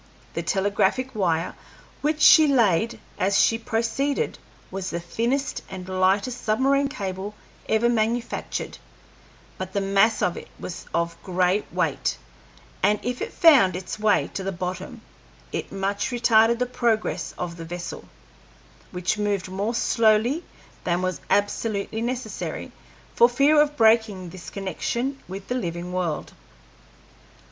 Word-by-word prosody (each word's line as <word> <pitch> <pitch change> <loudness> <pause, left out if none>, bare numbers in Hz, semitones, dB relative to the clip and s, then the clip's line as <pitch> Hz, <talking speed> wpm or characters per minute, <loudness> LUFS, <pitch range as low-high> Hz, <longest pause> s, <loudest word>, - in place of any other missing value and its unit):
The - - -2
telegraphic 205 +6 0
wire 175 -5 0 0.5
which 300 +1 0
she 315 -3 +8
laid 230 - +2 0.2
as 195 +1 +2
she 225 - +3
proceeded 250 - -1 0.3
was 190 0 -4
the 170 - -3
thinnest 235 +10 -1
and 185 -1 -7
lightest 195 +6 +1
submarine 270 +5 +2
cable 200 -5 -5 0.3
ever 220 +2 +3
manufactured, 235 +1 -1 0.8
but 185 0 -5
the 200 - +1
mass 195 +3 +3
of 175 - 0
it - - -8
was 175 - -7
of 170 0 -2
great 185 +2 0
weight, - - 0 0.6
and 210 +2 +3
as 245 0 -2
it - - -3
found 265 - +6
its 180 +3 -5
way 215 -1 +2
to - - -3
the 195 - -2
bottom 185 0 -5 0.5
it - - -4
much 200 +4 -1
retarded 235 -2 +4
the 250 - 0
progress 235 -3 -1
of 175 -1 -4
the 165 - -7
vessel, 175 +1 -6 0.8
which 180 +3 -2
moved 200 -3 -1
more 200 +5 -2
slowly 230 +7 +3 0.4
than 175 +1 0
was 185 -1 -2
absolutely 205 +1 0
necessary, 250 +2 -4 0.4
for 235 - +6
fear 285 +5 +5
of 295 0 0
breaking 220 -5 +3
this 175 -1 -9
connection 235 - -3
with 195 +1 -7
the - - -1
living 175 -6 -3
world. 175 -4 -2
205 Hz, 135 wpm, -24 LUFS, 185-240 Hz, 0.8 s, she